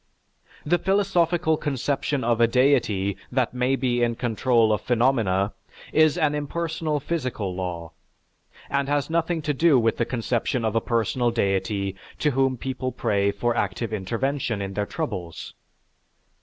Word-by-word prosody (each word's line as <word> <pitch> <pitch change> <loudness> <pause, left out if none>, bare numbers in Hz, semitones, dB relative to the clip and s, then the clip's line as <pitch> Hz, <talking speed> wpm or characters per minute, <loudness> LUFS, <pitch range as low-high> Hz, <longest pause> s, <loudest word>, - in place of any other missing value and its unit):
The 175 +3 +2
philosophical 175 -4 +2
conception 140 0 -1
of 120 0 +1
a 115 - +6
deity 115 -6 +2
that 125 -2 0
may 125 +1 +1
be 125 -2 0
in 120 -1 +1
control 115 -1 +2
of 105 - -1
phenomena 115 -6 +1 0.4
is 155 +1 +4
an 155 -4 +2
impersonal 155 +1 -2
physical 130 - -3
law, 90 -3 -5 0.8
and 140 0 -1
has 145 +1 0
nothing 165 -1 0
to 150 0 0
do 155 0 +4
with 115 -2 +2
the 120 - +1
conception 120 +1 -1
of 110 0 -1
a 115 - +3
personal 120 +2 0
deity 100 -2 -1 0.2
to 150 - +1
whom 135 -1 +1
people 130 +1 -3
pray 100 -4 +1
for 115 +4 -1
active 105 +3 -2
intervention 115 +3 -1
in 100 0 -4
their 105 +1 -2
troubles. 100 - -5
125 Hz, 145 wpm, -24 LUFS, 110-145 Hz, 0.8 s, a